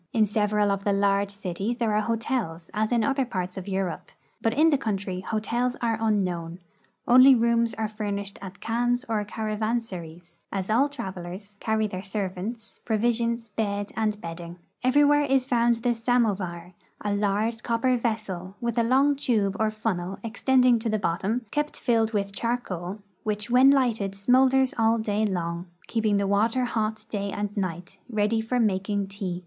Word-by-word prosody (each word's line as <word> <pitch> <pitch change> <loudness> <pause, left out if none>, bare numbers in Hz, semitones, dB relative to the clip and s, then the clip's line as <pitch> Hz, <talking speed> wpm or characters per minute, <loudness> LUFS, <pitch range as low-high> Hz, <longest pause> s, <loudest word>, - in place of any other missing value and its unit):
In 220 -2 +4
several 210 0 +1
of 200 0 -2
the 200 - +2
large 200 0 +2
cities 200 +3 -3
there 230 -4 0
are 210 - +3
hotels, 220 -7 -2
as 215 +1 0
in 235 -2 +3
other 275 -1 +1
parts 185 -7 -4
of 190 -2 -6
Euro])e, 190 -3 -2 0.4
but 225 - +2
in 310 +7 +4
tlie 285 - +2
country 195 -5 -2
hotels 230 +5 -1
are 230 -2 0
unknown; 180 -6 0 0.5
only 255 +2 +8
rooms 235 0 +2
are 220 -1 -1
furnished 205 -2 -4
at 195 0 -9
khans 245 +2 0
or 220 -2 0
caravansaries, 210 -6 -4
as 195 +1 -2
all 270 +6 +3
travelers 190 -5 -7
carry 220 0 0
their 185 -3 -4
servants, 200 +3 -5
pro 220 -2 0
visions, 235 0 0
bed, 205 -1 -2
and 215 -2 0
bedding. 170 -1 -7 0.3
Everywhere 290 +3 +5
is 270 -2 +2
found 240 -2 +3
the 240 +1 0
samovar, 205 -7 0 0.3
a 205 -1 -1
large 210 +3 0
copper 240 +2 +1
vessel, 215 -6 -3
with 235 0 -1
a - - +3
long 270 +5 +3
tube 215 -8 0
or 220 0 +2
funnel 195 -4 -3
extending 250 +1 +3
to 225 0 -2
the 215 - +1
bottom, 205 +6 -1
kept 295 0 -2
filled 225 -3 +2
with 200 -2 -2
charcoal, 195 -5 -3 0.2
which 210 +1 -3
when 255 +2 +7
lighted 230 -8 +2
smoulders 260 +5 +3
all 225 +1 +4
day 215 -1 0
long, 170 -2 -3 0.2
keeping 220 -3 +1
the 200 - +1
water 220 +6 +2
hot 220 -2 -2
day 200 -2 -3
and 205 0 -3
night, 185 -1 -4
ready 220 0 +1
for 245 +3 -1
making 200 -2 +1
tea. 195 -2 -5
215 Hz, 165 wpm, -26 LUFS, 195-235 Hz, 0.5 s, only